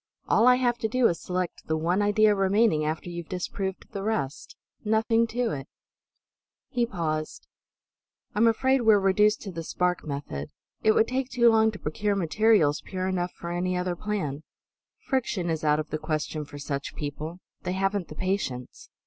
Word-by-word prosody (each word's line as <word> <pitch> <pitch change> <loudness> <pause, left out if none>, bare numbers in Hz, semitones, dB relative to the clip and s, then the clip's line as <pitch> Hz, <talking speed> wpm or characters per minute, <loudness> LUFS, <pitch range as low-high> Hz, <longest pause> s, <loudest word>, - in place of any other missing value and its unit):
All 230 - +4
I 250 - +8
have 245 -2 +1
to 220 - 0
do 245 +2 +3
is 170 - -3
select 180 -1 -3
the 160 - +1
one 175 +5 +1
idea 210 +1 +4
remaining 195 -4 +3
after 155 +3 -2
you've 170 -2 -6
disproved 190 +1 -4
the 200 - -4
rest. 155 -10 -3 0.3
Nothing 225 +1 +2
to 240 0 -1
it!" 135 -1 -5 1.0
He 240 -3 0
paused. 155 -6 -3 0.9
"I'm 225 +3 +4
afraid 260 +4 +3
we're 220 -2 +6
reduced 200 +2 +3
to 200 - -6
the 165 -1 -5
spark 180 +2 -1
method. 140 - -5 0.3
It 215 - +4
would 220 - +3
take 260 0 -1
too 235 -2 +5
long 220 0 +4
to - - -7
procure 200 +5 -1
materials 195 -4 +3
pure 185 -1 -4
enough 180 -1 -1
for 170 - -7
any 180 +1 -1
other 180 0 -1
plan. 170 -8 -3 0.6
Friction 220 - -1
is 160 -1 -2
out 150 0 +3
of 155 - -5
the 155 - -2
question 155 -1 -2
for 145 0 -10
such 140 -1 -4
people; 150 +3 -5 0.2
they 180 - -2
haven't 195 -1 0
the 155 - -10
patience. 185 -10 -3
185 Hz, 175 wpm, -27 LUFS, 155-220 Hz, 1.0 s, I